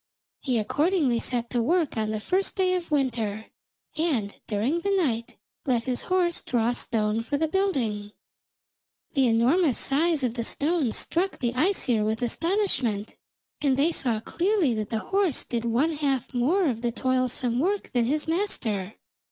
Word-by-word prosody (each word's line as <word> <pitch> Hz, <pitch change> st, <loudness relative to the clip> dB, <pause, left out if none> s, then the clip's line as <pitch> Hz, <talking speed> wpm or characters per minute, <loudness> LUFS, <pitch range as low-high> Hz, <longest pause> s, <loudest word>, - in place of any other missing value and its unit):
He 255 Hz, -4 st, -1 dB
accordingly 285 Hz, -, +1 dB
set 240 Hz, -1 st, 0 dB
to 245 Hz, -, +1 dB
work 330 Hz, +4 st, +1 dB
on 215 Hz, -1 st, -1 dB
the 215 Hz, 0 st, -2 dB
first 375 Hz, -, 0 dB
day 375 Hz, -2 st, +2 dB
of 360 Hz, -2 st, -3 dB
winter, 230 Hz, -7 st, -1 dB, 0.4 s
and 280 Hz, -11 st, 0 dB
during 230 Hz, +10 st, 0 dB
the 400 Hz, -, -2 dB
night 270 Hz, -, 0 dB, 0.3 s
let 240 Hz, -3 st, +1 dB
his 255 Hz, -1 st, -1 dB
horse 360 Hz, -2 st, +1 dB
draw 240 Hz, -1 st, 0 dB
stone 220 Hz, -2 st, +1 dB
for 285 Hz, +5 st, -2 dB
the 320 Hz, +2 st, +1 dB
building. 255 Hz, -, -1 dB, 1.0 s
The 270 Hz, -4 st, +3 dB
enormous 250 Hz, +6 st, +3 dB
size 305 Hz, +1 st, +1 dB
of 245 Hz, -3 st, 0 dB
the 235 Hz, -1 st, -3 dB
stones 285 Hz, -1 st, 0 dB
struck 370 Hz, +3 st, 0 dB
the 240 Hz, -2 st, -1 dB
Æsir 255 Hz, -, +2 dB
with 220 Hz, +3 st, -1 dB
astonishment, 265 Hz, -, 0 dB, 0.5 s
and 275 Hz, -3 st, +2 dB
they 300 Hz, +5 st, +3 dB
saw 240 Hz, -8 st, 0 dB
clearly 350 Hz, -, +1 dB
that 215 Hz, -2 st, -3 dB
the 225 Hz, -, -1 dB, 0.2 s
horse 390 Hz, -8 st, +2 dB
did 235 Hz, -1 st, -3 dB
one 245 Hz, +8 st, +1 dB
half 275 Hz, -4 st, -2 dB
more 310 Hz, +11 st, +2 dB
of 230 Hz, -4 st, -2 dB
the 240 Hz, -1 st, 0 dB
toilsome 255 Hz, -1 st, 0 dB
work 390 Hz, +7 st, -1 dB
than 240 Hz, -2 st, +2 dB
his 300 Hz, +6 st, -1 dB
master. 225 Hz, -, -1 dB
260 Hz, 160 wpm, -26 LUFS, 230-335 Hz, 1.0 s, The